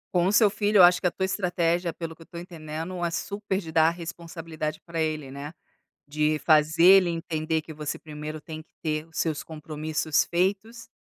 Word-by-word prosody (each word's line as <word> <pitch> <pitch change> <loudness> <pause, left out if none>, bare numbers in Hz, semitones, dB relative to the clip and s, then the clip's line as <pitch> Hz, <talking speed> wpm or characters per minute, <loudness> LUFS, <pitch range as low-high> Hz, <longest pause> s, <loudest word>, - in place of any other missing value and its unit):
Com 175 +1 +3
o - - +2
seu 210 +1 +6
filho, 205 +1 +1
eu 185 - +9
acho 180 0 +6
que 180 - +2
a - - 0
tua 190 - -1
estratégia, 175 -3 0
pelo 165 -1 -7
que 165 - -20
eu - - -12
tô 170 - -10
entendendo, 170 +1 -6
é 170 - +1
super 200 +3 -3
de 165 -4 -8
dar 160 0 +5
responsabilidade 165 -2 -6
para 165 -1 -3
ele, 155 -4 -2
né. 140 +2 -7 0.6
De 150 0 0
fazer 155 +2 +3
ele 185 -1 +7
entender 160 -1 -2
que 160 - -10
você 150 -1 -4
primeiro 155 0 -7
tem 155 0 -8
que 160 - -18
ter 155 0 -2
os 160 - -17
seus 155 -3 -1
compromissos 155 0 -1
feitos, 200 +6 -1
165 Hz, 200 wpm, -26 LUFS, 155-180 Hz, 0.6 s, eu